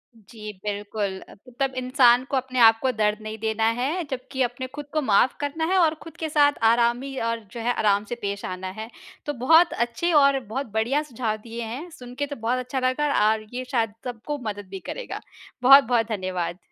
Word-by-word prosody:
जी, 215 0 -10
बिल्कुल 205 -1 -3
अ, - - -12 0.3
तब 270 -1 0
इंसान 250 -1 +4
को 275 - +1
अपने 255 -1 -2
आप 225 -1 +7
को 260 - +2
दर्द 210 -2 +1
नहीं 215 0 -6
देना 220 0 -1 0.2
है। 310 +8 -1
जबकि 260 +1 -4
अपने 245 +1 -3
खुद 295 0 -6
को 310 - +1
माफ़ 235 0 +3
करना 295 +3 -2
है 380 - +3
और 325 -2 +3
खुद 330 - -12
के 320 - -3
साथ 290 -1 +4 0.2
आरामी 240 +3 +1
और 230 0 -2
जो 235 - -7
है 240 +2 0
आराम 205 -2 +2
से 240 - -5
पेश 200 0 -3
आना 185 0 -5
है। 220 +1 -6 0.4
तो 295 - -2
बहुत 325 +5 +6
अच्छे 240 +9 -1
और 275 -1 +4
बहुत 260 +3 -5
बढ़िया 235 +7 +1
सुझाव 235 -6 -3
दिए 235 0 -6
हैं 255 +10 -6
सुन 250 -6 -11
के 285 +2 -1
तो 285 - -6
बहुत 235 +2 -1
अच्छा 255 +1 -3
लगा 255 -5 +2
और 220 0 -1
ये 255 +1 -4
शायद 225 -5 0
सबको 250 +4 -5
मदद 205 -2 -5
भी 195 0 -6
करेगा। - - -5 0.4
बहुत-बहुत 250 -4 +6
धन्यवाद। 185 -4 -3
245 Hz, 205 wpm, -24 LUFS, 220-275 Hz, 0.4 s, आप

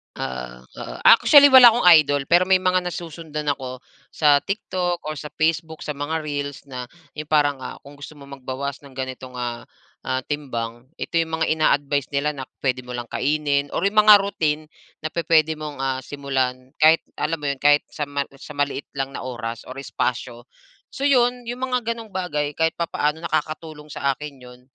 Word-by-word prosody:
Oo, 60 -1 -6 0.2
oo. - - -7
Actually, 285 +4 +8
wala 260 -2 +10
akong 240 - 0
idol. 145 -1 0
Pero 175 +2 +4
may 185 -1 +4
mga 185 0 +3
nasusundan 160 -3 -4
ako 130 -2 -7 0.3
sa 145 -2 +4
TikTok 180 -2 -3
o 155 - -4
sa 150 - -7
Facebook, 160 0 -1
sa - - -3
mga 150 +2 -3
reels 145 -2 -4
na 125 -2 -6 0.3
yung 155 0 -5
parang, 145 -3 +2
ah, - - -7
kung 145 0 -14
gusto 150 +2 -10
mo 140 - -13
magbawas 135 +1 -5
ng 135 -2 -15
ganitong, 130 -1 -6
ah, 120 -1 -5 0.4
ah, 130 0 0
timbang, 120 -5 -5
ito 170 - -2
yung 160 -1 -2
mga - - +4
ina-advice 145 -3 +1
nila 140 +2 +1
na 135 -3 -7 0.2
puwede 130 -1 0
mo 125 - -5
lang 120 -1 -6
kainin 145 -1 0
or - - -1
yung 205 +2 +3
mga 210 0 +9
routine 155 -6 -1 0.4
na 155 - -3
pu-puwede 160 -1 +2
mong, 150 -1 -6
ah, 130 -1 -1
simulan. 130 -2 -3
Kahit 160 +2 +5 0.2
alam 160 +2 -1
mo 145 - -5
'yon, 140 - -7
kahit 145 0 +4
sa 150 -2 -4
ma 145 0 -2
sa 150 - -10
maliit 145 0 -2
lang 135 0 -3
na - - -6
oras 120 -2 -6
or 130 - -8
espasyo. 120 -2 -4 0.4
So 275 - -7
'yon, 250 -3 +3
yung 245 +1 -6
mga 250 -2 -1
gano'ng 230 -2 -10
bagay 150 -6 -2
kahit 160 0 +1
papaano, 160 -2 -1
nakakatulong 155 -1 -4
sa 140 -1 -1
akin 150 0 -8
'yon. 125 0 -14
145 Hz, 185 wpm, -22 LUFS, 130-160 Hz, 0.4 s, wala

